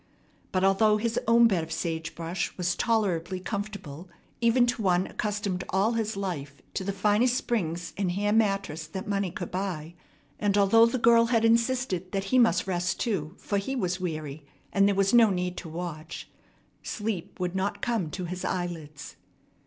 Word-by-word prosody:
But, 185 0 +1
although 210 +2 +4
his 230 +1 0
own 230 +1 +6
bed 185 -7 +1
of 160 - -9
sage 160 0 -3
brush 170 +2 -3
was 180 -1 0
tolerably 190 -6 0
comfortable, 190 -5 -6 0.3
even 240 +1 +4
to 240 -1 -1
one 185 -2 +2
accustomed 205 -3 -2
all 195 +4 +2
his 220 -3 -2
life 155 -8 -4 0.2
to - - -2
the 200 - -1
finest 210 +5 +2
springs 175 -9 -2
and 190 -3 0
hair 205 +2 0
mattress 195 -8 0
that 190 +4 -6
money 200 -2 0
could 175 +1 -6
buy, 180 -4 -3 0.5
and 205 -1 +1
although 225 +3 +6
the 245 +2 -1
girl 230 -1 +5
had 230 -1 +2
insisted 230 -6 +1
that 195 -1 0
he 255 - +6
must 235 -2 +4
rest 180 -1 -1
too, 175 -10 -2
for 200 - -1
he 265 +7 -3
was 185 -6 -1
weary 155 -4 -4 0.3
and 200 0 +4
there 200 - +2
was 195 +2 +2
no 235 -2 +7
need 180 -1 -2
to 165 - -6
watch, 165 -1 -6 0.5
sleep 205 -6 -4
would 180 0 -2
not 190 +2 -2
come 225 -9 0
to 180 +3 -5
his 180 +1 -5
eyelids. 165 -5 -4
195 Hz, 175 wpm, -27 LUFS, 175-220 Hz, 0.5 s, no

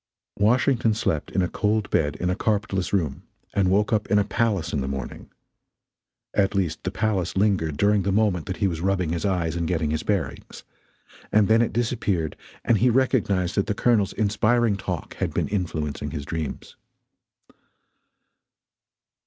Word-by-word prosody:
Washington 115 +1 +3
slept 80 -8 -1
in 95 - 0
a - - +1
cold 105 +2 0
bed 75 -3 +1
in 90 +1 -1
a - - 0
carpetless 100 -3 -1
room 80 -9 -1 0.3
and 95 -2 +2
woke 105 +4 +2
up 105 -1 0
in 105 - +4
a 105 - +4
palace 105 -4 -1
in 70 - 0
the 65 - -3
morning; 65 -1 -6 1.0
at 100 0 +1
least 85 -5 -1
the - - -1
palace 100 -3 -1
lingered 95 -7 +1
during 100 +4 +3
the 100 +1 0
moment 100 -5 +1
that 95 - -3
he 100 - +1
was 85 -3 -3
rubbing 95 -2 0
his 85 +3 -2
eyes 85 -4 0
and 85 -1 -1
getting 80 -3 0
his 80 0 -1
bearings 100 -5 -3 0.7
and 105 -2 +4
then 110 +1 +4
it 120 - +1
disappeared 105 - -1 0.3
and 115 -3 +3
he 125 +4 +4
recognized 110 -8 +1
that 100 - 0
the 105 - -1
Colonel's 110 -4 +2
inspiring 110 +1 +2
talk 100 - -5
had - - -2
been - - 0
influencing 80 -7 -2
his 75 -3 -5
dreams. 80 -2 -5
100 Hz, 170 wpm, -24 LUFS, 85-105 Hz, 1.0 s, in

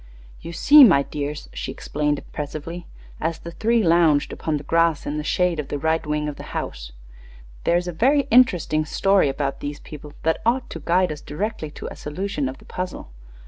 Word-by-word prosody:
"You 170 - -7
see, 290 - +8
my 165 - +6
dears," 145 +1 -5
she - - -4
explained, 150 0 -1
impressively, 155 +5 -7 0.3
as 165 0 -2
the 170 - -9
three 225 +6 +1
lounged 165 -4 +3
upon 155 -2 -2
the 145 - -8
grass 165 0 +2
in 150 - -3
the - - -4
shade 175 +2 +1
of 145 - -3
the - - -3
right 160 +3 0
wing 150 0 -2
of 150 - -5
the - - -8 0.2
house, - - -5 0.7
"there 170 - +4
is 175 0 -3
a - - -2
very 270 - +3
interesting 180 -10 +4
story 195 +1 +2
about 135 0 -2
these 145 0 -5
people 150 -1 -10
that 160 0 +1
ought 245 +3 0
to 165 - -6
guide 175 +3 +1
us 150 - -7
directly 160 0 -4
to - - -6
a - - -8
solution 150 -2 -3
of 130 - -8
the - - -18
puzzle. 180 - -6
160 Hz, 200 wpm, -23 LUFS, 150-180 Hz, 0.7 s, see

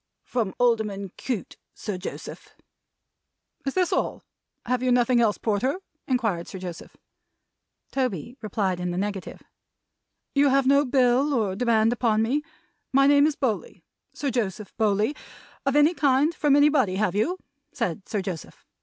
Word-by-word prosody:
"From 225 -6 -2
Alderman 215 -5 +1
Cute, 245 -7 -4 0.2
Sir 205 -4 -5
Joseph." 185 - -8 1.1
"Is 275 - -1
this 365 -2 +2
all? - - -1 0.4
Have 250 0 0
you 255 0 +1
nothing 245 0 +3
else, 215 -3 +2
Porter?" 240 - 0 0.3
inquired 225 -10 0
Sir - - -7
Joseph. 180 -2 -8 0.9
Toby 245 - -2
replied 195 -4 -1
in 180 0 -2
the 175 - -3
negative. 200 0 -4 0.9
"You 285 0 +4
have 270 0 +3
no 280 +2 +4
bill 260 +2 +3
or 205 -6 0
demand 225 0 +3
upon 225 -2 +2
me 265 +7 +1 0.5
my 275 +1 +5
name 285 +1 +6
is 310 - -1
Bowley, 265 - -3 0.3
Sir 280 -2 -3
Joseph 215 -4 -3
Bowley 215 +4 +1 0.5
of 275 - +2
any 295 +3 +5
kind 290 +1 +2
from 295 -3 +3
anybody, 285 -9 +4
have 200 -2 +1
you?" 260 - 0 0.3
said 195 - -3
Sir 205 -4 -1
Joseph. 180 -4 -7
240 Hz, 145 wpm, -25 LUFS, 205-275 Hz, 1.1 s, name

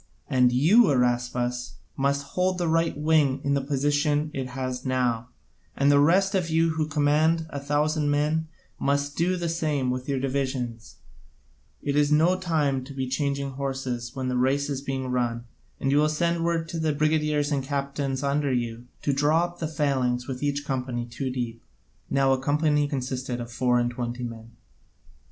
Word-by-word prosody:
And 125 -1 +4
then 125 - 0
you, 200 - +6
Araspas, 125 -1 0 0.2
must 140 +1 0
hold 185 0 0
the 175 -2 -1
right 165 -1 +1
wing 150 -3 +2
in 140 - +1
the 140 - +1
position 145 +2 +1
it 130 -1 -3
has 130 0 -4
now, 125 -2 0 0.5
and 140 +1 +4
the 145 - +5
rest 190 +7 +4
of 180 -4 0
you 165 +1 +3
who 160 -1 -1
command 155 +2 +2
a 140 - -4
thousand 150 +1 0
men 150 +2 +1 0.3
must 140 +1 0
do 180 +2 +1
the 170 -1 -2
same 150 -6 0
with 130 +2 -4
your 135 -1 0
divisions: 130 -4 -3 0.9
it 145 -1 -1
is 145 0 +3
no 160 +5 +4
time 155 -7 0
to 140 0 -10
be 130 -1 -2
changing 140 +1 -1
horses 130 -3 -4
when 130 -1 -3
the 125 - -1
race 140 +3 +1
is 135 -1 -3
being 135 -2 -3
run; 120 -1 -1 0.3
and 135 - 0
you 145 - +4
will 150 +1 +3
send 170 +2 0
word 165 -1 0
to 170 -2 -4
the 160 -1 +1
brigadiers 150 -1 +1
and 140 -2 0
captains 140 0 -2
under 140 0 +1
you 120 -1 -2 0.2
to 140 - +1
draw 150 +4 +3
up 175 0 -5
the 160 - -2
phalanx 130 -5 0
with 130 -2 -5
each 145 0 -1
company 125 -3 -2
two 130 +3 -4
deep." 120 -3 -4 0.5
(Now 135 -1 +3
a 130 - 0
company 150 +1 +2
consisted 130 -2 -3
of 120 0 -6
four 125 0 +2
and 120 0 +1
twenty 120 0 -4
men.) 115 -1 -7
140 Hz, 185 wpm, -26 LUFS, 130-150 Hz, 0.9 s, you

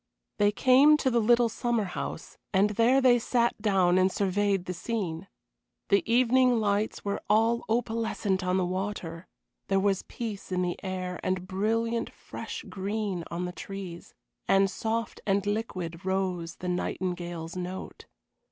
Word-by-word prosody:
They 205 0 +4
came 265 +8 +6
to 265 -3 +1
the 235 - +3
little 240 +2 +4
summer 235 0 0
house, 180 -3 -6
and 200 +1 +3
there 235 +5 +4
they 245 -2 +5
sat 235 -1 +1
down 185 -4 +3
and 185 +1 +3
surveyed 200 -1 +1
the 180 - -3
scene. 185 -2 -3 0.6
The 200 - +5
evening 250 0 +4
lights 210 0 0
were 200 - -2
all 225 +2 +3
opalescent 225 -4 0
on 180 +1 +1
the 185 - +1
water, 185 -2 -4 0.4
there 195 0 +2
was 195 -1 +1
peace 215 -5 -6
in 180 0 +1
the 175 -1 -3
air 185 -1 -4
and 185 -1 -1
brilliant 225 +4 0
fresh - - -8
green 200 -2 -3
on 175 +1 -3
the 180 - -4
trees, 180 -1 -8 0.3
and 195 0 +4
soft 230 +1 -3
and 195 0 +2
liquid 185 -5 -3
rose 185 -3 -1
the 180 - -7
nightingale's 175 -2 -3
note. 180 +1 -6
195 Hz, 150 wpm, -28 LUFS, 185-225 Hz, 0.6 s, came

